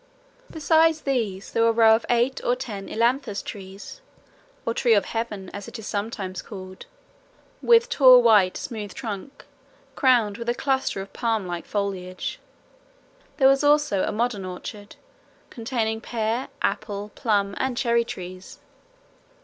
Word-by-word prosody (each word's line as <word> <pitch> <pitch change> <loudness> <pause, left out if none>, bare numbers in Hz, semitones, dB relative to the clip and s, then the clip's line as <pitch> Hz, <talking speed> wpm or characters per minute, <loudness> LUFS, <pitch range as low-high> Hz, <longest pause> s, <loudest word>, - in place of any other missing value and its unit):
Besides 320 0 +3
these 220 -8 -2
there 230 - 0
was 230 - +5
a - - -2
row 220 -1 +7
of 225 - -4
eight 245 +2 +1
or 245 - +2
ten 205 -6 -7
ailanthus 235 -2 0
trees, 195 - -9 0.6
or 230 - 0
tree 235 -2 +3
of 205 - +2
heaven 210 -5 -4
as 205 -1 -7
it - - -8
is 220 - -9
sometimes 200 -3 -4
called, 185 -3 -10 0.7
with 470 0 +5
tall 260 - +7
white 210 -5 +5
smooth 210 -4 -6
trunk 225 +2 -7 0.5
crowned 235 -6 +3
with 235 0 -4
a 240 - +1
cluster 265 -8 -1
of 195 - -10
palm 225 -4 -1
like 175 -1 -5
foliage. 190 -3 -3 1.0
There 265 -3 +5
was 275 +1 +4
also 290 -9 +3
a - - 0
modern 215 -2 -1
orchard, 205 +3 -8 0.6
containing 225 -2 -2
pear, 230 +2 -2 0.2
apple, 205 0 -2
plum, 200 -3 0
and 260 -2 -1
cherry 235 -2 +2
trees. 185 -3 -9
225 Hz, 145 wpm, -24 LUFS, 200-250 Hz, 1.0 s, row